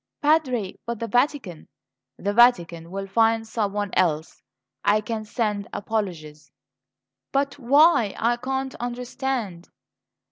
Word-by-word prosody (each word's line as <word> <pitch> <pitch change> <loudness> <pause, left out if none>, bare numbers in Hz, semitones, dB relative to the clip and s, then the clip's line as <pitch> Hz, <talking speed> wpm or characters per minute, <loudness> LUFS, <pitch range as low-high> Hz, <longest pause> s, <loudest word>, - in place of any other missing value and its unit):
"Padre! 260 -10 +1
But 235 0 -2
the 230 - -3
Vatican 245 - 0 0.3
" - - -61
"The 200 +1 -2
Vatican 175 -8 +3
will 195 +2 -4
find 225 +2 +2
someone 205 -3 -2
else. 160 -3 0 0.4
I 210 +1 +4
can 215 0 -4
send 210 -3 -2
apologies." 165 - -4 0.8
"But 275 +1 -1
why? 275 - +4
I 240 +1 +1
can't 265 +1 -3
understand." 245 -6 -4
225 Hz, 115 wpm, -24 LUFS, 195-250 Hz, 0.8 s, I